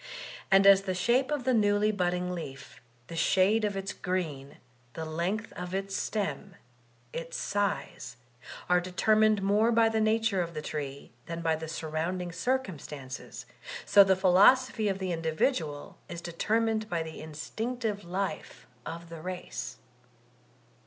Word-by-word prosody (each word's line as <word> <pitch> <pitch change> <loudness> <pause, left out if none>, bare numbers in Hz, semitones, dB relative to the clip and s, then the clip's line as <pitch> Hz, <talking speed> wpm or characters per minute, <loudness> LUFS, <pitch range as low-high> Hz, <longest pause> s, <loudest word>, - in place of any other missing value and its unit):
And 195 0 +6
as 195 -1 +8
the 190 -2 -3
shape 240 +8 +2
of 295 -4 -1
the 255 +1 +2
newly 210 -1 +3
budding 180 -2 -1
leaf, 140 -6 -8 0.2
the 165 - -8
shade 190 +6 +3
of 205 -2 0
its 195 0 -3
green, 155 -7 -3 0.4
the 160 - -5
length 175 +8 -2
of 180 +1 -5
its 195 0 -3
stem, 200 -2 -3 0.6
its 165 0 -5
size, 200 -11 -2 0.5
are 180 0 +4
de 180 +1 -7
termined 215 +1 +4
more 210 +4 +3
by 225 -1 +4
the 220 0 0
nature 220 -2 +2
of 170 -1 -4
the 155 - -3
tree 140 -3 -5 0.2
than 165 0 -4
by 160 -1 +2
sur 160 0 -5
rounding 175 +3 -2
circumstances, 165 - -4 0.4
so 200 - +8
the 190 -1 +3
philosophy 210 +5 +5
of 195 - -1
the 190 -2 -3
indi 160 -1 -2
vidual 155 - -1
is 170 - -5
determined 220 +6 0
by 170 -3 -1
the 160 0 -8
instinctive 210 +8 -4
life 190 +3 -4 0.2
of 170 0 -7
the 165 -1 -8
race. 180 +1 -6
185 Hz, 150 wpm, -29 LUFS, 165-215 Hz, 0.6 s, as